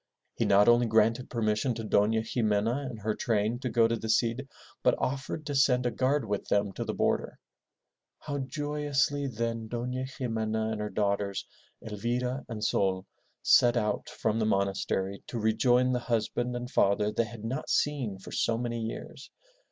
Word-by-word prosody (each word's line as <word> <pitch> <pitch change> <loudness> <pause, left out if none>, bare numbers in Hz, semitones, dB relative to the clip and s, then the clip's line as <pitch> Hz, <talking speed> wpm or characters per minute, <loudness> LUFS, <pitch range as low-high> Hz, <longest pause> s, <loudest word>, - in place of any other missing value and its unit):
He - - -1
not 100 +2 +5
only 120 0 +5
granted 115 +3 +2
permission 115 +1 0
to 115 - -5
Dona 110 +1 +2
Ximena 115 +4 0
and 115 -4 -8
her 110 +1 0
train 110 +1 0
to 125 - -3
go 115 -1 +4
to 115 - 0
the 110 0 -5
Cid, 120 +4 +1 0.3
but - - +3
offered 135 +4 -3
to 145 - -3
send 135 -2 +3
a 120 - +1
guard 135 +2 +1
with 105 -1 -3
them 100 -1 +1
to - - -4
the - - -4
border. - - 0 0.8
How 145 -1 -4
joyously 145 +1 -1
then 115 -2 -3
Dofia 125 +2 -3
Ximena 110 -4 -2
and 110 -1 -3
her 105 - -2
daughters, 100 -1 -1 0.4
Elvira 120 +5 -2
and 110 -2 -5
Sol, 95 -3 +1 0.4
set 120 0 +5
out 105 -2 -1
from 110 0 -1
the 110 - +1
monastery 100 -1 -1
to 120 - -5
rejoin 120 +3 +3
the 125 - +1
husband 120 +1 -1
and 120 0 -4
father 105 -3 +2
they 115 - +1
had 110 0 -10
not 130 +6 -3
seen 130 -9 0
for 95 - -11
so 115 -1 +1
many 120 -1 -3
years. 110 0 -7
115 Hz, 175 wpm, -29 LUFS, 105-125 Hz, 0.8 s, not